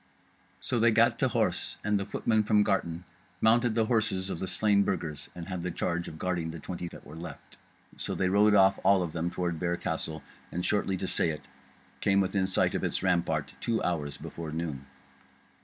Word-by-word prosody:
So - - 0
they - - +5
gat - - +4
to - - +3
horse, - - 0
and 105 -1 +2
the 100 - -4
footmen 110 -1 +1
from 105 0 +3
Garton 90 -4 -1 0.4
mounted 115 +1 +3
the 115 -1 +3
horses 110 -5 0
of - - -4
the 95 - -3
slain 100 +1 +3
Burgers, 80 -7 -2
and 85 0 -7
had 90 -2 -4
the 90 - -2
charge 85 0 -2
of 80 - -8
guarding 85 -1 -1
the 80 0 -6
twenty 85 +3 -5
that - - -11
were 75 - -10
left. 85 +2 -10 0.4
So - - -2
they 95 - +1
rode 105 +2 +5
off 95 -1 +5
all 100 -2 +5
of 85 - -5
them 85 +1 -1
toward 85 -2 -2
Bear 85 0 0
Castle, 80 -1 -3 0.3
and 90 +1 -2
shortly 100 -2 +1
to 95 - -3
say 85 - +2
it, 75 -1 -6 0.5
came 100 0 +3
within 95 0 +1
sight 95 - +2
of - - -2
its - - -1
rampart 80 -6 +1
two 115 -1 0
hours 75 -5 -2
before 80 -2 -7
noon. 75 -4 -4
90 Hz, 205 wpm, -29 LUFS, 85-100 Hz, 0.5 s, they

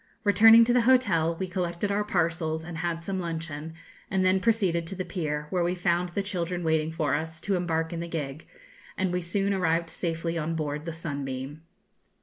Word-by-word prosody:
Returning 225 +3 +8
to 240 - +2
the 245 - +4
hotel, 170 -11 +3
we 190 - -1
collected 180 +1 -2
our 205 +1 +1
parcels 165 -4 -1
and 165 0 -6
had 170 -1 -2
some 190 +1 -2
luncheon, 160 -2 -5 0.3
and 190 0 +1
then 185 +1 +4
proceeded 190 -6 +1
to 195 - -3
the 185 0 -4
pier, 150 -5 -3
where 180 -2 +1
we 175 +1 0
found 175 0 +1
the 195 +3 -2
children 180 -2 -3
waiting 160 -1 +1
for 160 -3 -1
us 160 +2 -3
to 200 - 0
embark 165 -2 -1
in 170 - -3
the 170 - -4
gig, 150 -3 -5 0.5
and 185 -1 0
we 180 - 0
soon 195 +4 0
arrived 165 -3 0
safely 165 0 -2
on 160 +1 -2
board 150 -1 -3
the 165 - -3
'Sunbeam.' 140 -2 -5
170 Hz, 195 wpm, -27 LUFS, 160-185 Hz, 0.5 s, Returning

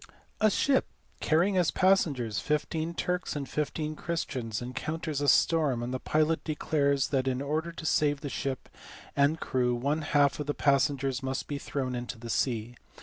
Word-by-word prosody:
"A 215 - +5
ship, 265 +6 +2 0.3
carrying 175 +5 +2
as 180 -3 +3
passengers 140 - +2
fifteen 155 - -1
Turks 180 0 -2
and 140 -2 -3
fifteen 150 +3 -2
Christians, 130 -10 -3
encounters 150 +4 -3
a 145 - 0
storm; 140 -4 +3
and 125 +1 -3
the 130 - -2
pilot 155 +3 +1
declares 140 -3 +1
that 135 -2 0
in 130 -1 0
order 155 +4 -2
to 165 -1 -8
save 145 -2 +2
the 150 - -4
ship 135 -1 -3 0.5
and 145 +3 +3
crew 125 -1 0
one 140 +6 0
half 145 -2 +2
of 150 - -3
the 145 - -1
passengers 140 -2 +2
must 130 0 -3
be 145 -1 -3
thrown 130 -3 -3
into 120 0 -4
the 115 0 -6
sea. 120 -1 -1
145 Hz, 170 wpm, -29 LUFS, 130-160 Hz, 0.5 s, A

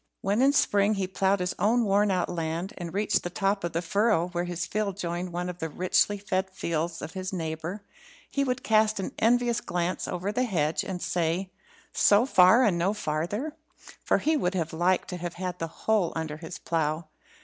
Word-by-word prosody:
When 200 +4 +1
in 275 +1 +5
spring 205 -6 +3
he 195 -1 -1
ploughed 190 +1 +1
his 180 0 -1
own 230 +3 +3
worn 205 +1 +3
out 185 -2 +1
land, 165 +2 -3
and 175 -2 -6
reached 205 +3 +1
the 175 - -4
top 195 +2 0
of 170 - -3
the 170 +2 -1
furrow 200 -2 +2
where 175 0 -2
his 175 -1 -3
field 200 +1 -2
joined 175 -1 -3
one 175 +1 -3
of 180 -1 -6
the 160 - -3
richly 185 +5 +2
fed 190 -1 -1
fields 170 -2 -3
of 160 - -6
his 185 0 -4
neighbour, 170 +3 -4 0.4
he 280 - 0
would 255 -1 -2
cast 215 -1 +3
an 190 - -3
envious 240 0 +2
glance 175 +1 -2
over 185 +3 -2
the 250 +4 0
hedge, 165 -8 0
and 185 -2 -5
say, 175 +2 -1 0.4
"So 205 +4 +5
far 205 0 +6
and 190 -7 +2
no 190 +5 +1
farther?" 205 - -2 0.5
for - - +3
he 315 +1 +1
would 190 -10 0
have 165 -3 -2
liked 175 +3 +1
to 180 - -4
have 175 -1 -5
had 180 -1 -4
the 165 - -2
whole 195 +1 0
under 160 -2 -3
his 165 +2 -8
plough. 160 0 -1
185 Hz, 205 wpm, -27 LUFS, 170-205 Hz, 0.5 s, far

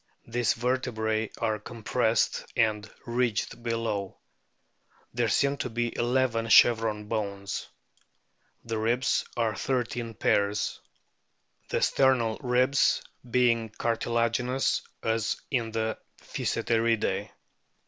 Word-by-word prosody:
These 120 0 +1
vertebrae 115 -3 -1
are 110 -1 -1
compressed 115 +1 0
and 110 -2 +1 0.2
ridged 120 -2 -1
below. 115 -4 -2 1.0
There 120 -1 +1
seem 140 +6 +2
to 125 - -3
be 120 0 -2
eleven 120 -2 +1
chevron 110 -2 +5
bones. 100 -3 -3 1.0
The 115 -1 -2
ribs 120 +4 +1
are 115 -2 +1
thirteen 120 -3 -2
pairs 100 +1 +1 0.9
the - - 0
sternal 125 -5 +3
ribs 130 +2 +3 0.3
being 115 -2 +2
cartilaginous 115 +3 0 0.2
as 110 -1 0
in 120 -4 0
the 110 0 -2 0.2
Physeteridae. 110 -4 0
115 Hz, 95 wpm, -28 LUFS, 110-120 Hz, 1.0 s, chevron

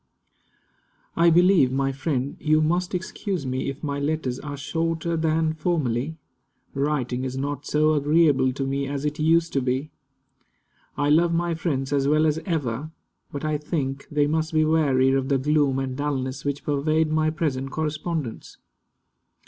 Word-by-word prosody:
I 170 0 +5
believe, 175 -5 +5
my 135 +1 0
friend, 135 -1 -2
you 155 +1 +3
must 175 +4 0
excuse 185 -2 -3
me 130 +1 -2
if 135 +3 -7
my 140 -1 -2
letters 140 -3 -2
are 145 -1 -6
shorter 165 +3 -2
than 160 0 +1
formerly. 155 -3 -1 0.6
Writing 135 -3 -1
is 130 0 -4
not 140 +1 -3
so 155 +1 +3
agreeable 145 -2 +3
to 135 +1 -3
me 135 +1 -1
as 140 +1 -3
it 150 +1 -2
used 165 +2 +2
to 135 - +1
be. 130 +4 -2 1.1
I 145 +1 +1
love 170 +2 +4
my 170 0 0
friends 145 -4 -2
as 140 -1 +2
well 155 +2 +3
as 155 0 +1
ever, 145 -4 -2 0.4
but 145 -1 -5
I 155 -1 0
think 140 -3 -3
they 145 -1 +2
must 160 +2 -1
be 155 0 +4
weary 140 -5 +3
of 135 0 0
the 140 - +3
gloom 145 0 +2
and 135 -1 -2
dulness 135 -2 -3
which 145 0 -3
pervade 155 +2 +1
my 155 0 +2
present 145 -4 -2
correspondence. 155 -3 -4
150 Hz, 160 wpm, -24 LUFS, 135-160 Hz, 1.1 s, I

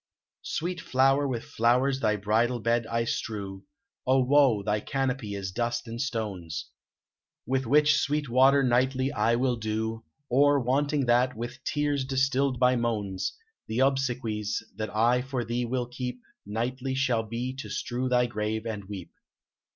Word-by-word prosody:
"Sweet 175 0 -3
flower, 135 +2 +3
with 120 -3 -3
flowers 125 +4 +2
thy 110 -4 +2
bridal 110 +4 +1
bed 115 0 +1
I 115 0 0
strew, 100 -4 -4 0.4
O 130 0 +4
woe! 130 -6 +4
thy 105 +1 0
canopy 130 -4 -2
is 95 -2 -4
dust 120 +3 -2
and 115 +1 -4
stones; 95 - -4 0.7
Which 130 0 -1
with 150 +4 +5
sweet 150 -1 +2
water 135 +3 +5
nightly 130 +2 +2
I 115 +1 +2
will 125 0 +1
dew, 110 +1 -3 0.2
Or, 145 +2 +4
wanting 140 +3 +1
that, 125 +1 +2
with 120 +3 -6
tears 145 -2 0
distilled 135 0 +1
by 125 0 +4
moans; 105 - -2 0.3
The 115 +4 -1
obsequies 120 -6 0
that 110 +1 -3
I 120 +3 +2
for 130 -2 -3
thee 120 +2 -1
will 125 +1 -1
keep 125 0 -5 0.3
Nightly 125 +5 -2
shall 125 -4 +1
be 115 +3 -4
to 135 - -6
strew 125 +1 -2
thy 125 -1 +3
grave 110 -1 -3
and 105 -3 -4
weep." 95 -3 -8
125 Hz, 150 wpm, -27 LUFS, 110-135 Hz, 0.7 s, with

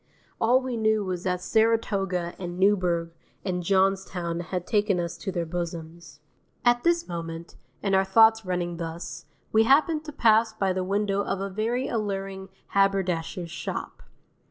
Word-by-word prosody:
All 245 +3 +4
we 255 -2 -4
knew 220 -2 +2
was 180 -2 -3
that 180 -1 0
Saratoga 195 -6 +1
and 175 -1 -5
Newburgh 180 -4 +2 0.3
and 180 -2 -1
Johnstown 190 -2 0
had 175 +1 -4
taken 205 -3 +1
us 170 0 -3
to 190 - -4
their 175 -2 -2
bosoms. 165 -3 -6 0.4
At 240 0 +4
this 340 0 +2
moment, 165 -1 -6 0.3
and 195 -1 0
our 190 0 +5
thoughts 225 +3 +5
running 175 -2 -2
thus, 165 0 -6 0.3
we 220 +1 +4
happened 305 +4 +4
to 300 - -6
pass 225 -4 +3
by 195 -3 0
the 185 0 -1
window 200 +1 0
of 195 - -2
a 195 0 -3
very 230 +6 -1
alluring 195 -3 -3 0.2
haberdasher's 185 -3 0
shop. - - -5
190 Hz, 155 wpm, -26 LUFS, 175-220 Hz, 0.4 s, our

